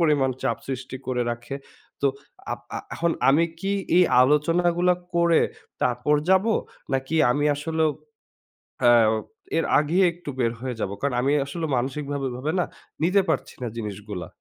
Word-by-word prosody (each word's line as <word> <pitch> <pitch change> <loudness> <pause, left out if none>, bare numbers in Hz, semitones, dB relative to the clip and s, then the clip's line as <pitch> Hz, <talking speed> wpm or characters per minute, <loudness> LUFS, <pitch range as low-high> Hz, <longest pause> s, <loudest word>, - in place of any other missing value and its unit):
পরিমাণ 145 -5 +3
চাপ - - +1
সৃষ্টি 130 0 -4
করে 125 -1 0
রাখে। 120 +3 -5 0.5
তো 140 - +3 0.5
আপ - - -5 0.2
আ - - -1 0.2
এখন 170 0 +1 0.2
আমি 150 +5 +5 0.2
কি 195 +2 -1 0.2
এই 180 - +7 0.2
আলোচনাগুলা 170 +5 +3 0.2
করে 170 -1 +4 0.4
তারপর 125 +4 +2 0.2
যাবো? 195 +4 +4 0.4
নাকি 135 +4 -1 0.2
আমি 145 +3 +1
আসলেও 160 +2 0 0.9
অ্যাও 115 -3 +6 0.4
এর - - +1
আগেই 165 +6 +3
একটু 170 -4 -8
বের 115 -2 +1
হয়ে 125 -1 -3
যাব? 95 - -1
কারণ 140 -3 0
আমি 135 +3 +2
আসলে 160 +3 -3
মানসিক 135 +4 -2
ভাবে 140 -1 -2
ওইভাবে 130 +5 -3
না - - +2 0.4
নিতে 185 +4 +4
পারছি - - -1
না 120 - -1
জিনিসগুলা। 105 -5 -5
140 Hz, 155 wpm, -24 LUFS, 125-165 Hz, 0.9 s, এই